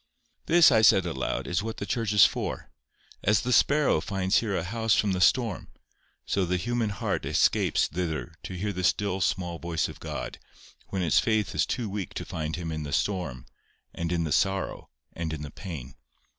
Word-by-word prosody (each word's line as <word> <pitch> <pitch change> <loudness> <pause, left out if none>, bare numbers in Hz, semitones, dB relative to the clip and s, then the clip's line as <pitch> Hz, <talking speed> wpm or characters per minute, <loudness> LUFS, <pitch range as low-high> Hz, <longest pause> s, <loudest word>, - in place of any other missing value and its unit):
"This," 170 -1 +7
I 110 - +5
said 100 -4 +6
aloud, 65 -7 -2
"is 85 +1 -1
what 110 +1 -5
the 100 - -4
church 115 -2 -1
is 105 -1 +7
for: - - -3 0.5
as 105 +1 +3
the 125 - 0
sparrow 145 - +4
finds 95 +3 +1
there 105 -4 -2
a 85 - -1
house 110 +3 +1
from 105 - +2
the 90 -1 -1
storm, 115 -2 +2 0.6
so 100 - 0
the 90 +1 0
human 120 +3 -1
heart 100 - -2
escapes - - +2
thither 85 -1 -3
to 95 - -7
hear 100 +3 -2
the 90 0 -4
still 95 +1 +1
small 90 -1 -1
voice 85 -2 -1
of - - -10
God - - -6 0.5
when 95 -2 -2
its 85 - +4
faith 110 -3 0
is - - +1
too 120 -4 -2
weak 100 -3 -5
to - - -4
find 80 -3 -4
Him 85 -2 -4
in 80 -1 -3
the 75 -1 -5
storm, 85 -7 -1 0.5
and 85 0 -3
in 85 -1 0
the 80 - -3
sorrow, 95 +3 0 0.2
and 85 -2 -4
in 75 -2 -5
the 75 - -7
pain." 75 -10 -8
95 Hz, 200 wpm, -27 LUFS, 85-105 Hz, 0.6 s, This